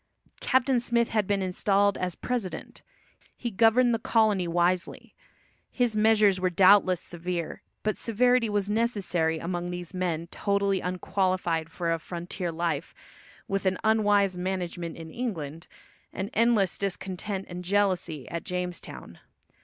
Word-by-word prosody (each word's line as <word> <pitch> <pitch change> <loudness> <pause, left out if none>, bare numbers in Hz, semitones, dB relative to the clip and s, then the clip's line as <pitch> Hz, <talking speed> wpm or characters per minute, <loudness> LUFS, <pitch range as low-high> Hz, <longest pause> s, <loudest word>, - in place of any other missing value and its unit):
Captain 260 -1 +2
Smith 235 -1 +1
had 215 -3 0
been 200 -1 +1
installed 200 +2 +2
as 180 -2 -3
president. 235 -7 -4 0.6
He 240 - -4
governed 230 +4 +4
the 230 - 0
colony 215 -5 +2
wisely. 175 +1 0 0.6
His 245 -4 0
measures 210 -3 +4
were 185 0 +1
doubtless 185 0 +5
severe, 175 -1 -5 0.2
but 215 -1 0
severity 245 +1 +2
was 205 -1 0
necessary 200 -7 0
among 175 +1 -3
these 175 0 -6
men 175 -3 -2
totally 200 -1 0
unqualified 180 -3 -1
for 170 -1 -1
a 165 - -2
frontier 175 +2 -5
life, 165 -2 -2 0.5
with 195 0 -1
an 185 0 +1
unwise 205 -3 +3
management 180 -2 -4
in 165 -1 -9
England, 165 - -5 0.4
and 195 +4 -5
endless 220 -5 +2
discontent 195 0 -3
and 180 0 -7
jealousy 180 -7 0
at 170 - -4
Jamestown. 180 -1 -6
190 Hz, 130 wpm, -27 LUFS, 175-210 Hz, 0.6 s, doubtless